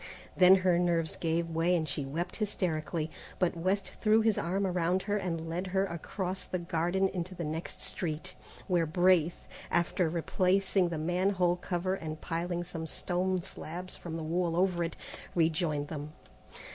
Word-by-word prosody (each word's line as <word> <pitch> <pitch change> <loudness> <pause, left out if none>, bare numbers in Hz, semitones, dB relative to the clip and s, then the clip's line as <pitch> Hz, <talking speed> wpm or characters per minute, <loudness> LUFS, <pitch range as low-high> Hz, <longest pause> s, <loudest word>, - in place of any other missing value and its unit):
Then 185 0 +8
her 175 -2 +4
nerves 170 -2 +2
gave 165 0 -1
way 165 +2 +2
and 160 -2 0
she 140 0 -1
wept 165 +7 -3
hysterically, 165 -6 -1 0.3
but 180 -3 +1
West 185 +2 0
threw 220 0 +5
his 220 -2 +3
arm 190 +4 0
around 180 0 +1
her 205 0 0
and 170 -5 -2
led 175 +3 -2
her 190 +1 +1
across 185 +2 -4
the 185 - -3
gardens 175 +2 0
into 185 0 -4
the 170 - -4
next 155 0 -4
street, 175 0 -3 0.3
where 175 -4 +2
Braith, 175 0 +3 0.2
after 175 0 +2
replacing 185 +2 +2
the 165 - -3
man 175 +5 +1
hole 180 -3 +2
cover 180 +1 -1
and 155 -4 -4
piling 175 +1 -2
some 165 -2 -5
stone 180 +2 0
slabs 180 0 -6
from 165 -2 -6
the 160 - -4
wall 170 +1 0
over 180 -2 +2
it, 165 - -3 0.4
rejoined 160 -3 +1
them. 150 -1 -5
175 Hz, 165 wpm, -31 LUFS, 165-185 Hz, 0.4 s, Then